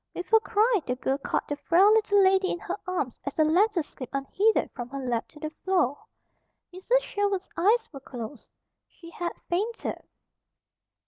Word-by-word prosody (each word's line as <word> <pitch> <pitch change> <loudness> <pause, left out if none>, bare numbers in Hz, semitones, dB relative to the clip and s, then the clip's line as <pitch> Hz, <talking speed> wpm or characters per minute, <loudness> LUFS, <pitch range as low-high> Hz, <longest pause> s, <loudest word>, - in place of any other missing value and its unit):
With 360 +5 -7
a 445 - +9
cry 440 -1 +2
the 250 - 0
girl 265 +2 -1
caught - - -2
the 290 - -2
frail 345 +8 +4
little 415 -2 +4
lady 380 0 +3
in - - -1
her 355 +1 -4
arms 350 -10 -2
as 280 - -5
the 310 - +4
letter 355 +3 +3
slipped 265 -2 -9
unheeded 390 +11 +1
from 245 0 -7
her 275 - -6
lap 245 -3 -2
to 300 - -16
the 310 +1 -5
floor. 360 - +1 0.7
Mrs. 470 +7 +1
Sherwood's 405 -4 -2
eyes 440 +7 +3
were 275 - -7
closed. 245 0 -9 0.4
She 335 -1 -14
had 345 0 -4
fainted. 420 +7 -2
355 Hz, 175 wpm, -27 LUFS, 280-410 Hz, 0.7 s, a